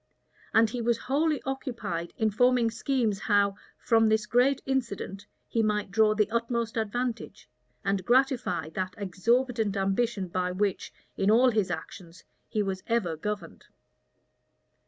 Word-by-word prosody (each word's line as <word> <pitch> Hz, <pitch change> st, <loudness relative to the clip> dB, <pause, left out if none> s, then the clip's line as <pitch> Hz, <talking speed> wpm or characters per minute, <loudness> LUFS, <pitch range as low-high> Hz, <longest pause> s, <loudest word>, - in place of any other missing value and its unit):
And 225 Hz, +1 st, +5 dB
he 245 Hz, -, -3 dB
was 235 Hz, -1 st, +1 dB
wholly 300 Hz, +3 st, 0 dB
occupied 240 Hz, -, -4 dB
in 220 Hz, -1 st, +1 dB
forming 245 Hz, +1 st, +3 dB
schemes 230 Hz, -3 st, 0 dB
how, 205 Hz, -2 st, +2 dB, 0.2 s
from 225 Hz, -1 st, +3 dB
this 215 Hz, 0 st, +2 dB
great 250 Hz, +5 st, +3 dB
incident, 210 Hz, -6 st, -3 dB, 0.2 s
he 230 Hz, -, 0 dB
might 210 Hz, -2 st, 0 dB
draw 215 Hz, +1 st, +3 dB
the 210 Hz, -1 st, +2 dB
utmost 235 Hz, 0 st, -1 dB
advantage, 225 Hz, -, -3 dB, 0.4 s
and 195 Hz, -1 st, 0 dB
gratify 240 Hz, -, +1 dB
that 185 Hz, +2 st, -4 dB
exorbitant 220 Hz, +3 st, 0 dB
ambition 195 Hz, +1 st, 0 dB
by 180 Hz, +1 st, -2 dB
which, 200 Hz, 0 st, -1 dB, 0.3 s
in 195 Hz, -, +2 dB
all 245 Hz, +4 st, +5 dB
his 210 Hz, -5 st, 0 dB
actions, 170 Hz, +1 st, -7 dB, 0.3 s
he 215 Hz, -, 0 dB
was 190 Hz, -1 st, -3 dB
ever 225 Hz, -9 st, 0 dB
governed. 200 Hz, 0 st, -6 dB
220 Hz, 135 wpm, -28 LUFS, 195-240 Hz, 0.4 s, And